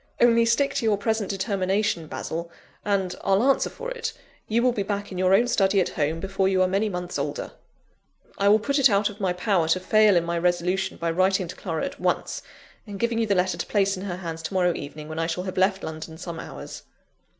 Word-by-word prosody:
Only 230 -1 +5
stick 235 +5 +2
to - - -1
your 215 -2 +2
present 220 -1 -1
determination, 195 -3 0
Basil, 170 +2 -5 0.3
and, 195 -3 0
I'll 195 +3 +3
answer 275 +1 +3
for - - -7
it, 470 -2 -4 0.3
you 230 +2 +1
will 250 - +4
be 220 - -2
back 205 0 -3
in 185 - -5
your 185 +1 +4
own 235 +4 +3
study 195 -4 +3
at 185 - +1
home, 155 +2 -1
before 195 +1 0
you 190 -1 +1
are - - +3
many 200 +3 0
months 180 -4 -4
older!" 145 +1 -3 0.9
"I 200 - +3
will 210 - +7
put 280 +6 0
it 270 -1 +6
out 205 0 +2
of 210 - -14
my 190 -3 +1
power 180 -2 +1
to 165 +3 +2
fail 215 +1 +4
in 170 - +2
my 170 0 -1
resolution, 180 +2 0
by 170 0 -1
writing 185 +1 +2
to 180 - -7
Clara 165 +1 -3
at 280 - -7
once, - - -1 0.5
and 200 -1 -7
giving 235 -1 0
you 225 - +1
the 200 - +2
letter 180 -1 +1
to - - -2
place 200 -1 +2
in 190 +1 -6
her 180 -3 -4
hands 165 -3 -6
to 165 +4 -5
morrow 180 -2 +3
evening, 150 +1 -7
when 155 +1 -5
I 165 - 0
shall 175 +2 -2
have 185 -1 -5
left 190 +1 +2
London 160 0 -6
some 170 -1 -6
hours." - - -8
190 Hz, 235 wpm, -25 LUFS, 175-210 Hz, 0.9 s, will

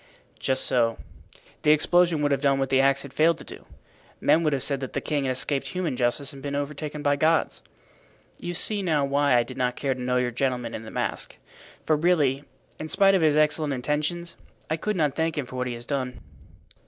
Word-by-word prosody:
"Just 130 0 +1
so. 115 -2 +2 0.6
The 150 - +4
explosion 170 +1 +3
would 145 - +2
have 135 -1 +1
done 140 -1 +3
what 135 -1 -1
the 135 0 +4
axe 135 0 +2
had 140 - -10
failed 165 +1 +3
to - - -11
do. - - -12 0.5
Men 165 - +3
would 155 -2 +1
have 135 -2 0
said 140 -2 0
that 130 -1 -6
the - - 0
king 145 -3 -2
had 130 - 0
escaped 135 +2 0
human 180 -7 -2
justice 125 +3 -1
and 135 - -11
been 140 0 -4
overtaken 145 +1 -4
by 145 -1 +3
God's. 160 +2 +1 0.8
You 175 0 -5
see 205 +4 +1
now 155 -6 +1
why 140 -1 +2
I 120 - +3
did 120 - -10
not 125 -1 0
care 135 -2 -1
to 130 - -8
know 125 0 0
your 125 -1 0
gentleman 125 -1 -2
in 110 - -6
the - - -8
mask; - - -3 0.5
for 155 - +3
really, 150 -4 +2 0.4
in 155 - -5
spite 195 +4 +4
of 190 - +3
his 155 -2 +3
excellent 155 -1 +2
intentions, 150 +6 -2 0.4
I - - +3
could 210 +6 -2
not 150 -5 +1
thank 160 -1 -1
him 145 - -1
for 130 - -10
what 125 0 -2
he 125 - -3
has 120 0 -9
done." 130 -3 -3
145 Hz, 225 wpm, -25 LUFS, 130-155 Hz, 0.8 s, The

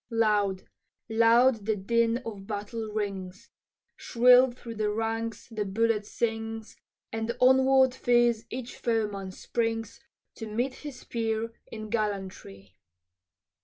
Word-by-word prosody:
Loud, 210 -4 +1 0.5
loud, 230 0 +4
the 220 - +2
din 230 +4 +1
of 200 -4 -7
battle 215 +1 -4
rings, 195 -3 -5 0.4
Shrill 250 +1 +5
through 240 -1 -9
the 215 -1 -1
ranks 225 +1 -3
the 215 -2 -2
bullet 210 +1 0
sings, 225 -1 -3 0.4
And 225 +2 -3
onward 260 0 +5
fierce 240 -3 +2
each 250 0 -6
foeman 210 -5 -1
springs 225 +2 -3 0.4
To 225 - -6
meet 240 +5 -1
his 290 -1 -9
peer 225 0 -2 0.2
in 215 -1 -7
gallantry. 185 - -4
225 Hz, 115 wpm, -28 LUFS, 210-235 Hz, 0.5 s, Shrill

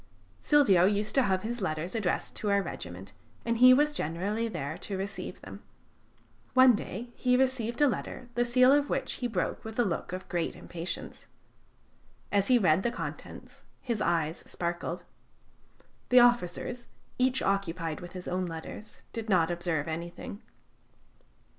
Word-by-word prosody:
Silvio 225 - +5
used 210 +2 +1
to 270 - +4
have 190 -4 +1
his 235 +1 -4
letters 160 -1 -2
addressed 215 -6 -1
to 210 - -2
our 200 0 +4
regiment, 90 - -8 0.3
and 230 0 0
he 255 +1 +9
was 295 +3 +4
generally 205 - -1
there 155 -7 -4
to 195 +2 -5
receive 195 +1 -5
them. - - -10 0.9
One 260 -1 +8
day 230 +3 -5
he 250 -1 +2
received 255 -3 0
a - - +6
letter, 255 -1 -4
the 240 +1 +2
seal 255 +2 +5
of 285 0 +3
which - - -1
he 245 - +1
broke 200 -6 -2
with 220 0 -8
a 240 - +3
look 175 -2 -3
of 185 +1 -6
great 170 -2 -2
impatience. 170 +1 -6 1.0
As 200 -1 +2
he 255 - +6
read 180 -5 +3
the 240 - +1
contents, 235 - -8 0.2
his 235 -4 -3
eyes 165 -4 +1
sparkled. 175 0 -3 1.1
The 250 - +8
officers, 240 0 +2 0.3
each 255 +1 +2
occupied 180 -5 -1
with 175 0 -9
his 180 -1 -7
own 185 0 -1
letters, 165 +6 -9
did 225 -1 -5
not 175 -3 +3
observe 170 -3 -1
anything. 170 +5 -6
200 Hz, 155 wpm, -29 LUFS, 175-240 Hz, 1.1 s, he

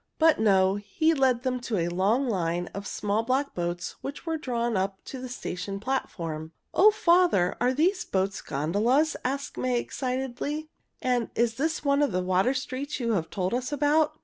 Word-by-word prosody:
But 320 -4 +4
no, 195 -2 +4
he 210 +11 +1
led 260 -4 +2
them 255 -1 0
to 240 -3 -2
a 170 -1 +1
long 200 +10 +1
line 175 -4 -1
of 200 0 -5
small 210 +1 0
black 260 +4 0
boats 175 0 -3
which 280 +4 -6
were 325 -1 -1
drawn 240 -6 -1
up 190 +1 -1
to 260 - -7
the 255 - -6
station 195 -4 -5
platform. 165 -10 -3 0.2
"O 420 - +7
father! 350 - +3
Are 250 +1 +3
these 350 +8 +2
boats 190 +1 -1
gondolas?" 215 - +1
asked 275 +2 -3
Molly 255 -1 0
excitedly. 265 +5 -3 0.3
"And 245 -3 +1
is 235 -1 +2
this 305 +5 -2
one 280 +1 +3
of 285 -9 +1
the 185 0 0
water 185 +8 +2
streets 270 +2 -4
you 235 -2 0
have 175 -7 0
told 185 +1 -2
us 250 +2 -2
about?" 300 +1 +2
245 Hz, 180 wpm, -27 LUFS, 195-280 Hz, 0.3 s, O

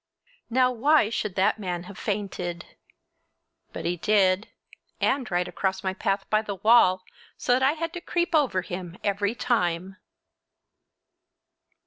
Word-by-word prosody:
Now 255 +1 +3
why 250 -1 +3
should 210 -5 -3
that 200 +3 +2
man 180 -3 -3
have 195 +2 -11
fainted? 185 -5 -4 1.1
But - - -7
he 175 +1 -1
did, 195 +1 +2 0.5
and 265 -2 0
right 180 0 0
across 190 0 -2
my 190 -1 -1
path 195 +1 -2
by 215 0 +2
the 205 -2 -5
wall, 190 -3 +4 0.3
so 245 - +1
that 255 - +2
I 270 +2 +4
had 330 +1 -4
to 350 - -6
creep 345 0 -1
over 265 - +2
him 180 0 -7
every 205 +2 0
time! 185 -5 -1
200 Hz, 140 wpm, -26 LUFS, 185-240 Hz, 1.1 s, wall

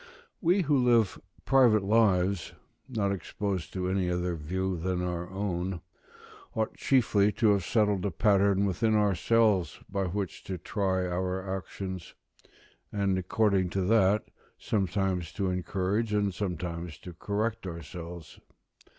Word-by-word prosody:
We, 180 +3 +3
who 145 -3 +3
live 115 -5 +3 0.2
private 120 -6 +5
lives, 100 -4 +2 0.4
not 105 -5 0
exposed 100 -1 -3
to 90 -1 -2
any 95 -1 0
other 90 0 -1
view 95 +4 -2
than 90 +2 -2
our 90 0 -3
own, 95 -2 -3 0.7
ought 110 -1 -1
chiefly 110 -6 +3
to 110 -3 +3
have 100 -2 +2
settled 105 -2 +1
a - - 0
pattern 100 +1 +3
within 110 +3 +1
ourselves 105 -2 +2
by 100 -1 -1
which 95 0 -4
to 95 - -4
try 95 0 -1
our 90 +1 -2
actions: 95 -1 -6 0.8
and 100 -2 +1
according 95 0 +1
to - - +2
that, 105 +1 +3 0.3
sometimes 95 -4 -1
to 95 -2 -1
encourage 95 +4 -1
and 100 -2 +1
sometimes 85 -4 -4
to 90 - -10
correct 105 +4 -2
ourselves. 85 -1 -8
95 Hz, 130 wpm, -29 LUFS, 90-105 Hz, 0.8 s, private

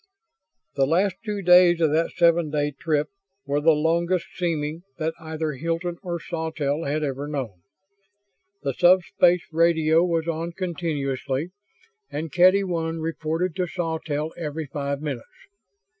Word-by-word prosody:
The 135 -1 +2
last 185 +4 +2
two 210 -3 -3
days 180 -1 +6
of 160 -3 +3
that 165 +2 +2
seven 170 -2 +4
day 145 0 0
trip 150 +1 -1 0.4
were 145 +1 0
the 160 +1 +5
longest 170 +3 +1
seeming 160 -3 -2 0.2
that 160 0 -1
either 160 -1 -3
Hilton 165 +4 -3
or 175 -2 -4
Sawtelle 160 -2 -3
had 150 +2 -1
ever 140 0 -3
known. 130 - -5 1.0
The - - -1
sub 180 0 +5
space 175 0 +3
radio 165 0 +3
was 170 -2 0
on 165 +1 -3
continuously 155 -4 -3 0.6
and 155 +1 -5
Kedy 185 +5 +5
One 165 -3 -2
reported 160 +2 -2
to 180 -1 0
Sawtelle 160 -2 -3
every 160 -1 -4
five 140 0 -4
minutes. 135 -6 -4
160 Hz, 140 wpm, -24 LUFS, 150-170 Hz, 1.0 s, days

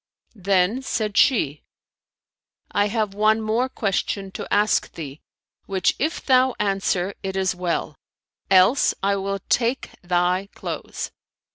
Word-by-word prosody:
Then 195 +3 +1
said 215 -5 -2
she, 155 - +3 1.1
"I 205 0 +2
have 210 -2 -1
one 215 +2 +3
more 225 +4 0
question 195 -3 -2
to - - -7
ask 210 +1 +2
thee, 145 -2 -8 0.5
which 190 -2 +1
if 315 +4 -2
thou 260 -1 +4
answer, 195 -2 0
it 190 0 -4
is 190 -1 +1
well; 175 -4 -2 0.5
else, 190 +7 +5
I 200 0 +2
will 195 0 -3
take 240 +2 0
thy 180 +2 0
clothes." - - -5
200 Hz, 125 wpm, -23 LUFS, 185-220 Hz, 1.1 s, else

